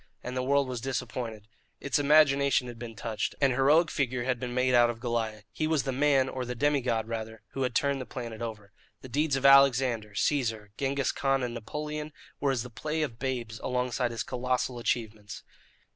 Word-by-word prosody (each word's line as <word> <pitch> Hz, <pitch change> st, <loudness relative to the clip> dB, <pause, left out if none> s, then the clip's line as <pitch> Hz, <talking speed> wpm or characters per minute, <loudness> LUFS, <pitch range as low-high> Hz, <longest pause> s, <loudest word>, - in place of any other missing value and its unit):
And 125 Hz, -, -5 dB
the 130 Hz, -, 0 dB
world 140 Hz, +1 st, +2 dB
was 125 Hz, -2 st, -4 dB
disappointed. 120 Hz, -4 st, -4 dB, 0.3 s
Its 140 Hz, 0 st, 0 dB
imagination 140 Hz, -3 st, +4 dB
had 120 Hz, -1 st, -9 dB
been 115 Hz, -1 st, -7 dB
touched. 110 Hz, +1 st, -3 dB
An 140 Hz, -2 st, +4 dB
heroic 145 Hz, +6 st, +4 dB
figure 125 Hz, -3 st, -1 dB
had 125 Hz, -1 st, -1 dB
been 125 Hz, 0 st, -4 dB
made 125 Hz, +1 st, +1 dB
out 120 Hz, -1 st, +6 dB
of 115 Hz, -1 st, -4 dB
Goliah. 115 Hz, -3 st, -2 dB
He 155 Hz, -, -1 dB
was 155 Hz, -3 st, +1 dB
the 135 Hz, -, -2 dB
man, 135 Hz, 0 st, +3 dB
or 130 Hz, -1 st, -4 dB
the 125 Hz, 0 st, -4 dB
demi 145 Hz, +2 st, +2 dB
god, 115 Hz, -3 st, -1 dB
rather, 110 Hz, -1 st, -5 dB
who 135 Hz, -, -5 dB
had 125 Hz, -2 st, -1 dB
turned 140 Hz, -1 st, +1 dB
the 130 Hz, -, -7 dB
planet 120 Hz, -3 st, -6 dB
over. 105 Hz, -4 st, -6 dB, 0.3 s
The 130 Hz, -, -10 dB
deeds 145 Hz, +3 st, +1 dB
of 135 Hz, 0 st, -2 dB
Alexander, 130 Hz, -6 st, +5 dB
Caesar, 110 Hz, -4 st, 0 dB
Genghis 140 Hz, 0 st, 0 dB
Khan, 135 Hz, -1 st, 0 dB
and 120 Hz, -1 st, -2 dB
Napoleon 150 Hz, +6 st, -5 dB, 0.3 s
were 140 Hz, -, +1 dB
as 130 Hz, -4 st, 0 dB
the 125 Hz, -, -10 dB
play 155 Hz, +8 st, -2 dB
of 120 Hz, -6 st, -5 dB
babes 120 Hz, -4 st, -3 dB
alongside 125 Hz, -1 st, -1 dB
his 115 Hz, -1 st, -3 dB
colossal 125 Hz, 0 st, -2 dB
achievements. 110 Hz, -3 st, -3 dB
125 Hz, 200 wpm, -29 LUFS, 115-140 Hz, 0.3 s, out